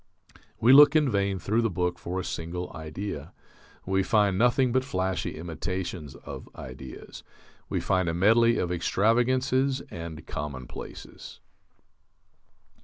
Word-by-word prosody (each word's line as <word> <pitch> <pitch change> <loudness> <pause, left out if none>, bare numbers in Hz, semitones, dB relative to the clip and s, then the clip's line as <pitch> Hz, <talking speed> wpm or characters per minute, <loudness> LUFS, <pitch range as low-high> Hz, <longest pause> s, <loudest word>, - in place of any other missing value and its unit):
We 120 +4 +6
look 145 +1 +9
in 150 -4 +4
vain 100 -1 0
through 105 +6 0
the 115 - +1
book 90 -1 -1
for 90 +3 -4
a - - -3
single 90 +2 -5
idea. 80 0 -6 0.5
We 95 +1 +1
find 100 0 +2
nothing 125 +4 +3
but 130 +1 +2
flashy 95 -7 -2
imitations 85 -1 -5
of - - -9
ideas. 65 -1 -9 0.5
We - - -1
find 95 -2 +1
a - - -1
medley 115 +5 +4
of 90 - -1
extravagances 130 +8 +2
and 85 -2 -7
commonplaces. 70 -3 -8
95 Hz, 125 wpm, -27 LUFS, 85-115 Hz, 0.5 s, look